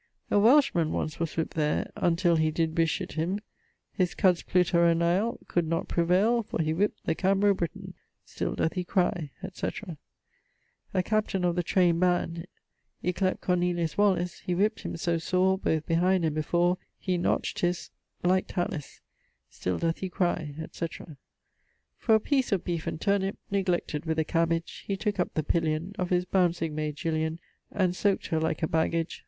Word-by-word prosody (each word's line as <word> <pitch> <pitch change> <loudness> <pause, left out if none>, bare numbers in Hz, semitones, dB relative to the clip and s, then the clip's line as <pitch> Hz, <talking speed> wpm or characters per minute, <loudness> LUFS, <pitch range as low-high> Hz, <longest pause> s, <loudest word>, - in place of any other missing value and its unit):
A 205 - +5
Welsh 265 +7 +5
man 165 -3 +1
once 155 - -3
was 165 -2 -2
whip't 160 - -1
there 150 -1 0
Untill 170 0 +2
he 155 0 +2
did 160 0 0
bes... 165 -1 +2
him 175 +5 -2 0.5
His 180 -2 0
Cuds 185 -4 +3
pluttera 170 -2 +3
nail 180 +7 +1
Could 170 -2 0
not 165 +1 -1
prevail 190 +8 +3
For 205 - -5
he 155 -1 +1
whip't 200 +6 +1
the 160 - +2
Cambro 195 +3 +3
Britan. 170 -3 -5 0.3
Still - - -3
doth 160 - 0
he 180 - -2
cry, 175 -4 0
etc. 185 -2 -5 1.0
A 185 - +3
captain 210 -3 0
of 175 -1 +1
the 175 - +1
train'd 175 -1 +2
band; 175 -1 0 0.6
Yclept 185 +1 0
Cornelius 175 -2 0
Wallis; 190 -4 +1
He 180 - -2
whip't 210 +4 +1
him - - -5
so 170 0 0
sore 185 +3 +2
Both 160 -5 0
behind 175 +1 +2
and 155 - 0
before 175 +4 +1 0.2
He 180 -2 -1
notch't 175 - 0
his.... 175 0 -1 0.3
like 185 +1 +2
tallyes. 170 -5 -4 0.5
Still 90 -1 -2
doth 165 -1 -1
he 190 - -3
cry, 175 -5 -1
etc. 160 -2 -6 0.8
For 225 - +4
a - - +4
piece 265 +1 0
of 195 -4 +1
beef 170 -2 -3
and - - -3
turnip, 200 0 0
Neglected, 180 -6 -1
with 160 0 0
a 160 - +1
cabbage, 165 0 -1
He 195 - -1
took 205 -1 -2
up 180 - -1
the 155 - 0
pillion 165 +3 -1
Of 180 -1 -1
his 180 0 +2
bouncing 175 -4 +1
mayd 150 -1 -2
Jillian; 160 0 -1 0.3
And 185 -3 +1
sowc't 200 +1 +1
her 160 - +1
like 160 0 -1
a - - +3
baggage. 165 +1 0
175 Hz, 175 wpm, -28 LUFS, 165-185 Hz, 1.0 s, A